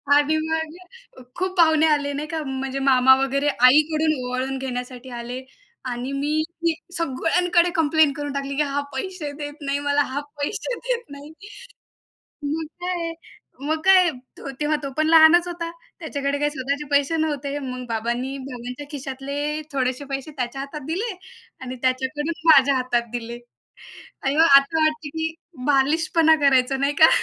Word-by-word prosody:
आणि 295 +2 +3
मग 320 - -6
खूप 370 +1 -3
पाहुणे 320 -2 +5
आले 285 -2 +1
नाही 295 +2 -4
का, 315 0 -3
म्हणजे 270 -1 -4
मामा 265 -1 +6
वगैरे 275 +2 0
आईकडून 305 +4 +4
ओवाळून 255 +2 -2
घेण्यासाठी 250 -1 -6
आले 245 +2 -6 0.5
आणि 245 +2 -4
मी 295 +3 0 0.2
की 335 - +3 0.2
सगळ्यांकडे 340 +3 +2
कंप्लेन 315 -1 +3
करून 290 0 -5
टाकली, 275 0 -3
की 295 - +1
"हा 285 0 -1
पैसे 305 +1 -4
देत 290 -1 -6
नाही 280 0 -1
मला, 285 0 +3
हा 280 0 -2 0.2
पैसे 425 +10 -2
देत 485 -1 0
नाही." 285 +2 -10 1.2
मग 320 +1 -2 0.2
काय 355 -2 -2 0.6
मग 315 0 0
काय? 370 -2 +6 0.5
तेव्हा 300 +1 +1
तो 275 - -4
पण 310 0 +2
लहानच 330 +2 +7
होता, 340 -1 -4 0.3
त्याच्याकडे 285 -3 -2
काय 295 0 +1
स्वतःचे 280 +1 -3
पैसे 285 +3 +2
नव्हते. 290 -3 -2
मग 255 -2 -6
बाबांनी, 240 +4 -2
बाबांच्या 250 +1 -7
खिशातले 280 +2 -4
थोडेसे 260 0 -1
पैसे 275 +3 -4
त्याच्या 250 +1 -3
हातात 280 +2 -7
दिले 395 +7 -2 0.5
आणि 255 0 -6
त्याच्याकडून 260 +5 -1 0.2
माझ्या 275 -2 +6
हातात 245 -2 0
दिले 235 0 -5 0.8
आणि 270 +1 0
आता 315 0 +5
वाटते, 310 -1 0
की 320 +2 -3 0.4
बालिशपणा 320 +3 +3
करायचो, 265 0 +3
नाही 280 +2 0
का? 320 - +10
285 Hz, 150 wpm, -23 LUFS, 265-315 Hz, 1.2 s, का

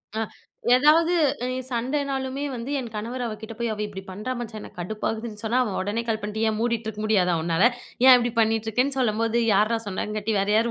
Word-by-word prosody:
அ, - - -1 0.6
எதாவது 315 +6 +5 0.3
அ - - -1 0.2
சண்டனாலுமே 265 +2 -2
வந்து 245 +3 -5
என் 245 -3 -5
கணவர் 235 +4 -4
அவ 225 - -3
கிட்ட 220 +1 -7
போய் 235 -1 -1
அவ 210 - -8
இப்டி 200 -2 -7
பண்றா 210 +7 -5
மச்சான். 225 -2 -6
எனக்கு 205 - -12
கடுப்பாகுதுன்னு 215 +3 -4
சொன்னா, 230 +3 +1
அவன் 210 -6 -3
உடனே 205 +4 -1
கால் 220 -1 0
பண்ட்டு 210 +1 -4
ஏன் 220 - +1
மூடிட்டு 230 -1 -1
இருக்க 215 -1 -5
முடியாதா 185 -5 +3
உன்னால? 165 +5 +2 0.4
ஏன் 260 - +10
இப்டி 240 0 0
பண்ணிட்டுருக்கன்னு 225 +4 +1
சொல்லும்போது, 230 -1 +1 0.2
யார்ரா 215 +4 +3
சொன்னங்காட்டி 210 +2 -3
வேற 195 - 0
யாரு 230 +2 +3
225 Hz, 190 wpm, -25 LUFS, 210-245 Hz, 0.6 s, ஏன்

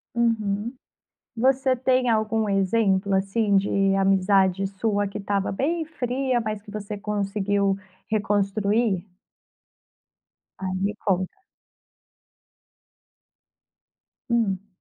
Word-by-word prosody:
Uhum. 225 -1 0 0.6
Você 260 +2 +3
tem 255 0 +2
algum 220 -1 +1
exemplo, 195 0 +2
assim, 200 +1 +2
de 195 0 +2
amizade 195 0 +3
sua, 205 +1 -1
que 200 - -5
estava 200 -1 -1
bem 320 - -1
fria, 255 -4 -1
mas 215 -2 -3
que 205 - -12
você 210 0 -5
conseguiu 200 -1 0 0.3
reconstruir? 205 -1 +1 1.6
Ah, 190 - -3
me 205 +2 0
conta. 190 - -1 2.9
Hum. 205 -4 +1
205 Hz, 90 wpm, -24 LUFS, 195-230 Hz, 2.9 s, Você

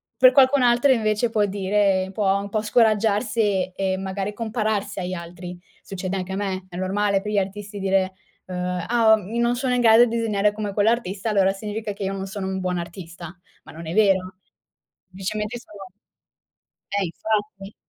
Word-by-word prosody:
per 255 0 +7
qualcun 270 0 +5
altro 245 +3 +4
invece 215 0 +1
può 210 -2 +2
dire 195 -1 +1
può 195 -1 +2
un 200 - -5
po' 215 +1 -1
scoraggiarsi 215 -3 +2
e 190 -1 -1
magari 195 +1 -3
compararsi 220 -3 -2
agli 180 0 -3
altri. 175 +1 -8 0.2
Succede 190 0 -5
anche 185 0 -4
a - - -2
me, 190 -2 -3
è 175 - -8
normale 195 +1 0
per 210 +1 -4
gli 205 - 0
artisti 200 +1 -5
dire, 190 -1 +1 0.3
uhm: 180 -1 -3
"Ah, 225 -2 +5
ehm, 210 +5 -6
non 240 +1 +2
sono 255 -1 0
in 245 - +2
grado 230 +1 +7
di 230 0 -3
disegnare 210 -2 +1
come 210 -1 -4
quell'artista, 210 -1 0
allora 195 -2 +3
significa 210 +1 -5
che 200 0 -6
io 195 0 -2
non 195 0 -4
sono 195 -1 -5
un 190 0 -3
buon 180 -1 -1
artista." 170 0 -8 0.3
ma - - -13
non 165 +1 -9
è 165 - -4
vero. 190 -3 +2 0.7
Semplicemente 210 +5 -4
sono 195 -5 -13 1.0
Eh, 200 -1 0
infatti. 205 +2 -3
200 Hz, 180 wpm, -23 LUFS, 190-220 Hz, 1.0 s, per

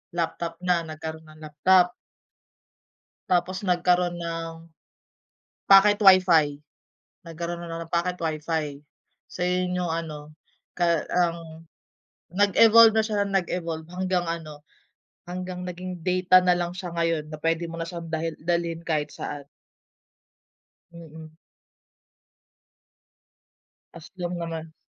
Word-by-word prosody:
laptop 170 0 -3
na, 180 -1 +2
nagkaroon 160 0 -7
ng 155 0 -16
laptop. 180 +4 +3 1.4
Tapos 185 +2 0
nagkaroon 175 -1 +1
ng 165 -1 -4 1.2
pocket 205 +1 +7
WIFI, 180 -7 +5 0.6
nagkaroon 170 +1 -6
na 165 -1 -6
ng - - -32
pocket 180 +1 -1
WIFI. 155 -2 -3 0.5
So, 180 - -4
yun 180 0 0
yung 175 -2 -1
ano, 155 -2 -6 0.4
ka 170 -2 +1
ang 165 -2 -2 0.7
nag-evolve 220 +4 +6
na 220 - +3
siya 210 -2 -1
ng 195 - -5
nag-evolve 170 -3 -2
hanggang 185 0 -1
ano, 155 -3 -7 0.7
hanggang 180 0 -5
naging 180 0 -7
data 185 +1 +4
na 180 -1 +3
lang 175 0 -2
siya 180 0 -6
ngayon 165 -2 0
na 155 - -7
pwede 165 +2 -1
mo 165 - -7
na 165 - -3
siyang 170 -1 -7
dalhi 160 0 -2
dalhin 170 0 -1
kahit 155 -3 -2
saan. 145 -1 -7 1.5
Mm. 160 -1 -12 2.6
As 170 -2 -12
long 175 0 -3
naman. 165 -1 -6
170 Hz, 115 wpm, -25 LUFS, 160-180 Hz, 2.6 s, pocket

